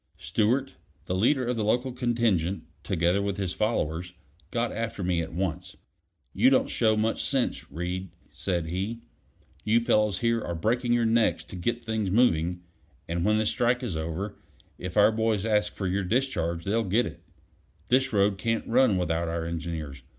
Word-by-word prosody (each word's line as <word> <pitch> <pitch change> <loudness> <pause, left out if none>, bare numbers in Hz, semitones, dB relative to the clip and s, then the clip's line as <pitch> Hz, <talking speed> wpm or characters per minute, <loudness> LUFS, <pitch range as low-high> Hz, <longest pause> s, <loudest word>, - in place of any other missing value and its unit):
Stewart, 115 - 0 0.3
the - - -2
leader 125 +8 +2
of 125 +1 0
the 110 - 0
local 125 +5 +1
contingent, 115 -8 0 0.2
together 85 +4 +1
with 100 -1 -2
his 95 -2 -2
followers, 90 -6 -1 0.4
got 120 +2 -1
after 115 -3 -3
me 90 -2 +1
at 80 - -5
once. 90 +2 -3 0.6
"You 115 +7 +5
don't 135 - +2
show 110 -2 +2
much 110 +1 0
sense, 135 - -1
Reed," 90 +4 -4 0.2
said 85 -4 -2
he. 95 +8 -3 0.6
"You 110 +2 +3
fellows 105 -4 +2
here 115 +1 +1
are 85 - -4
breaking 120 +7 0
your 120 -1 +2
necks 115 0 +2
to - - -10
get 120 +7 -2
things 110 -3 -1
moving, 90 -5 +2 0.4
and 85 +1 -1
when 105 +2 +3
this 110 -1 +2
strike's 120 -5 0
over, 85 +6 -4 0.4
if 90 +2 -5
our 105 +1 +6
boys 110 -2 0
ask 105 -1 +1
for 100 - -4
your 95 +2 0
discharge, 90 -7 0
they'll 110 +5 +1
get 110 +5 +2
it. - - -8 0.7
This 130 +2 +3
road 100 -1 +2
can't 115 +2 -1
run 120 -4 +3
without 85 -1 0
our 80 0 -2
engineers. 80 -5 -5
105 Hz, 170 wpm, -27 LUFS, 90-115 Hz, 0.7 s, our